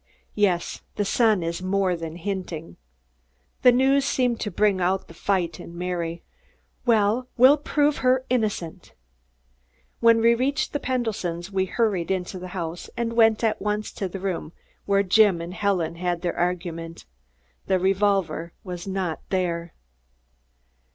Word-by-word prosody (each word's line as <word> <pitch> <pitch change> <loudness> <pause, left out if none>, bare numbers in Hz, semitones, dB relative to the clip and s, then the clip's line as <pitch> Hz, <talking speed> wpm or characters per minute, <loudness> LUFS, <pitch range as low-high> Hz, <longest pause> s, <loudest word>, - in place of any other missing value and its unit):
"Yes. 190 -5 0
The 205 - 0
Sun 215 -3 +3
is 170 +2 -3
more 185 -1 +1
than 165 -1 -6
hinting." 180 -3 -5 0.8
The 250 - +7
news 270 +3 +3
seemed 250 -3 +1
to 210 - -2
bring 200 0 +2
out 185 +2 0
the - - -13
fight 175 -2 -1
in 170 - -10
Mary. 170 -2 -3 0.6
"Well, 225 +2 +3
we'll 260 +4 +7
prove 295 0 +1
her 255 0 +2
innocent." 205 -8 -2 1.1
When 230 -1 +5
we 230 +1 +5
reached 275 +5 -1
the 290 - 0
Pendletons' 205 -9 -2
we 190 -1 +1
hurried 195 -4 0
into 185 0 -2
the 185 - -7
house 170 0 -5
and 235 -1 -1
went 225 -1 +4
at 220 -1 +1
once 210 +1 -2
to 195 - -4
the 195 - -6
room 180 -4 -3 0.3
where 200 0 +3
Jim 200 -1 +4
and 170 +2 -6
Helen 180 -4 0
had 175 0 -2
their 175 - -1
argument. 170 -2 -3 0.6
The 190 - +3
revolver 190 -3 +1
was 180 -1 -7
not 190 -4 -2
there. 170 -3 -1
190 Hz, 145 wpm, -24 LUFS, 175-225 Hz, 1.1 s, The